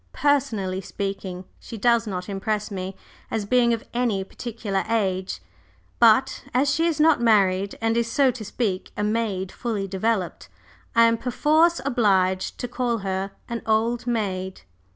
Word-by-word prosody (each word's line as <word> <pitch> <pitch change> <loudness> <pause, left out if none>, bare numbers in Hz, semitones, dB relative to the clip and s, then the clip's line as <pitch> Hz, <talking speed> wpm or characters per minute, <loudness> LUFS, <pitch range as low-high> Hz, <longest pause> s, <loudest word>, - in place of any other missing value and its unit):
Personally 215 -10 +1
speaking, 195 -1 -5
she 230 - -9
does 235 +1 +3
not 180 -3 -4
impress 210 +2 -2
me 190 0 -5 0.3
as 220 -2 -2
being 240 +2 +3
of 230 -1 -1
any 235 -5 0
particular 210 -2 -4
age, 190 -4 -1 0.6
but 240 +3 +4
as 275 +2 +3
she 325 +3 +2
is 320 -2 -1
not 305 -4 +4
married, 200 -4 +3
and 225 0 +1
is, 230 0 0
so 270 0 +4
to 235 -2 -8
speak, 205 -3 -2
a 210 - -1
maid 210 -4 -1
fully 215 -5 -3
developed, 195 -1 -2 0.5
I 230 - +7
am 230 0 +3
perforce 310 +7 +3
obliged 190 -7 +1
to 245 - -4
call 240 -1 -1
her 190 0 -2 0.2
an 235 -1 -4
old 230 +3 +1
maid." 190 - -2
220 Hz, 150 wpm, -24 LUFS, 195-240 Hz, 0.6 s, I